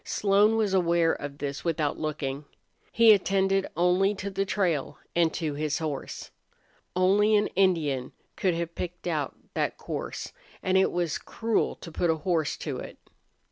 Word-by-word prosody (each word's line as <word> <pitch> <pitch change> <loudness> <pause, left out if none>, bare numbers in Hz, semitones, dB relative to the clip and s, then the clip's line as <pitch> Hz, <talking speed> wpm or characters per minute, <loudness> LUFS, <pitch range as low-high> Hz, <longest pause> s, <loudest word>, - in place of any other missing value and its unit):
Slone 210 +2 +3
was 210 -3 +1
aware 170 -2 +3
of 145 0 -6
this 140 -1 -4
without 155 -3 -1
looking. 150 -2 -3 0.5
He 230 -2 +7
attended 195 -1 +1
only 180 +4 +3
to 200 +1 -5
the 195 +1 -1
trail 175 -9 0 0.2
and 170 -2 +3
to 160 -3 -2
his 150 0 -1
horse. 155 -4 -5 0.6
Only 200 +4 +4
an 210 0 +3
Indian 155 -9 +1 0.2
could 185 -3 +1
have 170 0 -3
picked 180 0 -6
out 155 -5 -1 0.2
that - - -1
course, - - -5 0.3
and 185 - +1
it 190 - +4
was 175 -4 -1
cruel 225 -1 -1
to 165 - -10
put 170 +2 0
a 160 - +3
horse 165 -5 +1
to - - -4
it. - - -9
175 Hz, 160 wpm, -27 LUFS, 155-195 Hz, 0.6 s, He